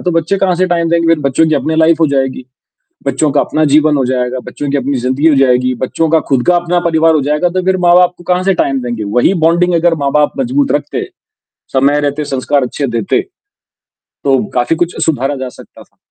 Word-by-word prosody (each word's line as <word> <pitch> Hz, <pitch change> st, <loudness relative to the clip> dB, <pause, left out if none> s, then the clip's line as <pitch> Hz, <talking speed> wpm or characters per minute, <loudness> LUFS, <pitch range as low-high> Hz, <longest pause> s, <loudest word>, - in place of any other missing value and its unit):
तो 180 Hz, -, -1 dB
बच्चे 165 Hz, +3 st, 0 dB
कहाँ 190 Hz, -2 st, +1 dB
से 185 Hz, -, +1 dB
टाइम 170 Hz, -2 st, 0 dB
देंगे, 170 Hz, -1 st, +3 dB
बच्चों 150 Hz, +1 st, 0 dB
की 155 Hz, -, +1 dB
अपनी 160 Hz, +2 st, -1 dB
लाइफ 160 Hz, 0 st, +3 dB
हो 160 Hz, -, +4 dB
जाएगी। 135 Hz, -2 st, -2 dB, 0.6 s
बच्चों 150 Hz, -3 st, 0 dB
का 145 Hz, -, +2 dB
अपना 155 Hz, -, -1 dB
जीवन 150 Hz, +1 st, +3 dB
हो 135 Hz, -, 0 dB
जाएगा, 125 Hz, 0 st, -2 dB
बच्चों 145 Hz, -, -5 dB
की 145 Hz, -, +1 dB
अपनी 135 Hz, 0 st, -2 dB
ज़िंदगी 130 Hz, +5 st, 0 dB
हो 150 Hz, -, +4 dB
जाएगी, 125 Hz, -1 st, +2 dB
बच्चों 160 Hz, +5 st, -1 dB
का 160 Hz, 0 st, +3 dB
खुद 130 Hz, -3 st, +1 dB
का 180 Hz, -, +4 dB
अपना 175 Hz, 0 st, 0 dB
परिवार 165 Hz, 0 st, +3 dB
हो 150 Hz, -, +1 dB
जाएगा, 150 Hz, +5 st, 0 dB
तो 185 Hz, +1 st, -2 dB
फिर 190 Hz, 0 st, +1 dB
माँ-बाप 180 Hz, +1 st, +4 dB
को -, -, -15 dB
कहाँ 180 Hz, +1 st, 0 dB
से 195 Hz, 0 st, +2 dB
टाइम 135 Hz, -6 st, -1 dB
देंगे? 120 Hz, -3 st, -4 dB
वही 120 Hz, -, +1 dB
बॉन्डिंग 175 Hz, +2 st, +2 dB
अगर 170 Hz, 0 st, +2 dB
माँ-बाप 150 Hz, +1 st, +1 dB
मज़बूत 270 Hz, +2 st, 0 dB
रखते, 145 Hz, 0 st, -2 dB, 0.7 s
समय 140 Hz, +2 st, +2 dB
रहते 145 Hz, +1 st, -2 dB
संस्कार 140 Hz, 0 st, -1 dB
अच्छे 140 Hz, +3 st, -3 dB
देते। 195 Hz, -, 0 dB, 0.8 s
तो 135 Hz, -2 st, -1 dB
काफ़ी 125 Hz, +6 st, 0 dB
कुछ 175 Hz, +1 st, -2 dB
सुधारा 140 Hz, -2 st, -1 dB
जा 130 Hz, -1 st, -5 dB
सकता -, -, -15 dB
था। -, -, -27 dB
150 Hz, 215 wpm, -13 LUFS, 135-170 Hz, 0.8 s, हो